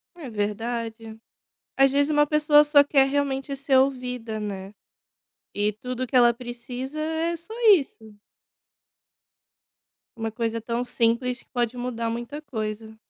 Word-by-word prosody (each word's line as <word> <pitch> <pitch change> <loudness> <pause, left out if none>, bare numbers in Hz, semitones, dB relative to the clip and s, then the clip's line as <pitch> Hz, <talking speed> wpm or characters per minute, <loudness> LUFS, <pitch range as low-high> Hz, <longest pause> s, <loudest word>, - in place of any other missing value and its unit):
É 315 -7 -8
verdade. 225 +1 -4 0.6
Às 270 0 +5
vezes 285 +2 +2
uma 295 0 +4
pessoa 300 0 +5
só 290 -1 +6
quer 275 -2 +3
realmente 275 0 -1
ser 275 0 +1
ouvida, 250 -4 0
né, 195 -1 -6 0.8
e 205 +1 +1
tudo 255 +3 -5
que 260 - -5
ela 240 -1 +6
precisa 245 +4 -7
é 320 +2 -1
só 340 +7 -12 0.2
isso. 220 - -2 2.0
Uma 225 -1 -4
coisa 230 0 -2
tão 235 +2 -2
simples 245 +1 0
que - - -27
pode 240 -1 -1
mudar 245 -2 -3
muita 240 +5 -5
coisa. 220 -5 -5
245 Hz, 135 wpm, -25 LUFS, 225-280 Hz, 2.0 s, só